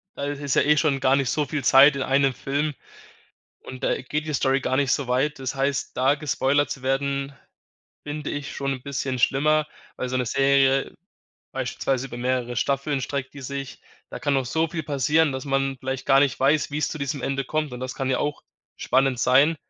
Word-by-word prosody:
da - - -5
ist 145 0 -4
es 140 -3 -1
ja - - +5
eh 150 +2 +3
schon 150 -3 +1
gar 130 0 +4
nicht 135 -3 0
so 150 - 0
viel 140 0 -3
Zeit 135 +3 +7
in - - -3
einem 135 0 +2
Film 145 +3 -2 0.9
und 130 - -8
da - - 0
geht 150 +4 -3
die 155 - -3
Story 135 +1 +2
gar 130 - -1
nicht 140 -1 +1
so 140 -4 0
weit. 135 +4 0
Das 130 0 -4
heißt, 135 0 -2
da 135 +3 +3
gespoilert 145 -1 +1
zu 135 - -5
werden, 140 +1 -1 0.7
finde 150 0 -5
ich 145 -1 -5
schon 140 -1 -2
'n 130 - -9
bisschen 135 -2 -3
schlimmer, 155 +4 +2 0.3
weil 130 - -3
so 130 - -1
'ne 125 - -1
Serie 135 +1 +2 0.6
beispielsweise 130 0 -2
über 120 - -8
mehrere 125 -1 -1
Staffeln 140 +3 0
streckt 130 0 -4
die 140 - -9
sich. 135 0 -6 0.3
Da - - -6
kann 145 - 0
noch 135 -2 0
so 160 +5 0
viel 160 0 -4
passieren, 150 +2 +2
dass 130 0 -5
man 135 -1 0
vielleicht 130 0 -4
gar 135 0 +5
nicht 140 -2 +1
weiß, 145 +3 +2
wie's 150 +1 -1
zu 155 - -6
diesem 140 -1 -3
Ende 135 +1 -1
kommt 155 0 -2
und 125 - -7
das 130 0 -4
kann 135 0 -2
ja 130 - +1
auch 145 0 -2 0.3
spannend 130 -1 +1
sein 145 +5 +4
135 Hz, 215 wpm, -24 LUFS, 130-145 Hz, 0.9 s, Zeit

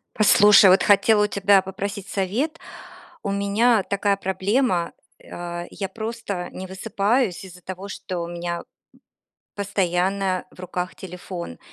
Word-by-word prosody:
Послушай, 205 -1 +7
вот 185 +2 +5
хотела 210 +1 +4
у - - -1
тебя 200 -1 +4
попросить 195 +1 -5
совет. 235 - -2 0.6
У 200 - -2
меня 200 +3 +2
такая 200 0 0
проблема, 190 0 0 0.3
э, - - -18
а, 175 0 -5
я 195 -2 -5
просто 220 -5 -5
не 185 - -7
высыпаюсь 200 +2 0
из-за 180 -1 -13
того, 185 +2 -7
что 185 -2 -5
у 170 - -4
меня, 170 0 -4
м, - - -10 0.9
постоянно 190 -1 0
в - - -15
руках 180 0 -4
телефон. 180 - -8
195 Hz, 140 wpm, -23 LUFS, 180-205 Hz, 0.9 s, Послушай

